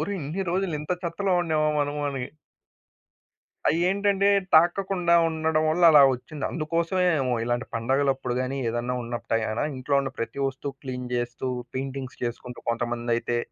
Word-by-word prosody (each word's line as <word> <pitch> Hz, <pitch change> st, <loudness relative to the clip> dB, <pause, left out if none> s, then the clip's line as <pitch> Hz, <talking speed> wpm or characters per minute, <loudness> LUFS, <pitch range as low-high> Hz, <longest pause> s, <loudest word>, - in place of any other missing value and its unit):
ఒరేయ్ 200 Hz, -1 st, -2 dB
ఇన్ని 155 Hz, +7 st, -3 dB
రోజులింత 170 Hz, -5 st, -2 dB
చెత్తలో 185 Hz, +3 st, -1 dB
ఉండామా 155 Hz, -2 st, +1 dB
మనమని. 145 Hz, -3 st, -2 dB, 1.4 s
అయ్యేంటంటే 195 Hz, +4 st, +2 dB, 0.3 s
తాకకుండా 175 Hz, +1 st, +4 dB
ఉండడం 160 Hz, -1 st, 0 dB
వల్ల 175 Hz, +3 st, 0 dB
అలా 150 Hz, -3 st, +8 dB
ఒచ్చింది. 145 Hz, +4 st, -7 dB
అందుకోసమే 170 Hz, +3 st, 0 dB, 0.2 s
ఏమో 130 Hz, -1 st, 0 dB
ఇలాంటి 120 Hz, +1 st, -1 dB
పండగలప్పుడు 135 Hz, +2 st, 0 dB
గాని 130 Hz, +2 st, -2 dB
ఏదైనా 120 Hz, +2 st, -2 dB
ఉన్నపుడే 120 Hz, -1 st, -2 dB
గణ 110 Hz, +1 st, -2 dB, 0.2 s
ఇంట్లో 135 Hz, +2 st, -1 dB
ఉన్న 135 Hz, -1 st, -3 dB
ప్రతి 115 Hz, -, -4 dB
వస్తువు 135 Hz, +1 st, -3 dB
క్లీన్ 125 Hz, -1 st, -5 dB
చేస్తూ 120 Hz, +1 st, -3 dB, 0.3 s
పెయింటింగ్స్ 135 Hz, 0 st, -5 dB
చేసుకుంటూ 125 Hz, +1 st, -5 dB
కొంతమందైతే. 120 Hz, 0 st, -1 dB
140 Hz, 130 wpm, -26 LUFS, 125-165 Hz, 1.4 s, అలా